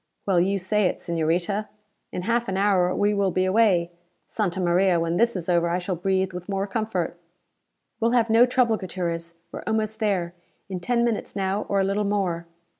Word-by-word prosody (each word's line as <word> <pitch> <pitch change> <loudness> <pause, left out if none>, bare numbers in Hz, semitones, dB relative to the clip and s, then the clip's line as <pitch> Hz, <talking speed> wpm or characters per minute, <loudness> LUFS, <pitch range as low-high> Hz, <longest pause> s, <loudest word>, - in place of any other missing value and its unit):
"Well 190 -3 +3
you 195 +3 +2
say 195 +1 +2
it. - - -2
Señorita. 170 +5 -1 0.4
In 180 - -4
half 235 +3 0
an 190 - -2
hour 195 -3 +3
now, - - -2
we 205 +1 +2
will 200 -1 +1
be 185 +1 +1
away. 185 -4 +3 0.4
Santa 190 -4 -2
Maria, 180 0 +3
when 165 +1 0
this 235 +1 +2
is 175 -3 -4
over 170 -1 +2
I 175 - +1
shall 180 +1 -3
breathe 190 +1 0
with 180 +2 -7
more 195 0 -1
comfort!" 200 -5 -3 0.8
"We'll 230 - +2
have 235 -2 +3
no 230 +2 +5
trouble, 245 -3 +2
Gutierrez. 170 -3 -4 0.2
We're - - -6
almost 220 0 -1
there. 185 -5 0 0.4
In 185 -2 -4
ten 235 +6 +1
minutes 230 -3 -2
now, 195 +1 -1
or 200 - +2
a - - +3
little 200 +2 0
more." 190 -5 -1
190 Hz, 195 wpm, -24 LUFS, 175-210 Hz, 0.8 s, no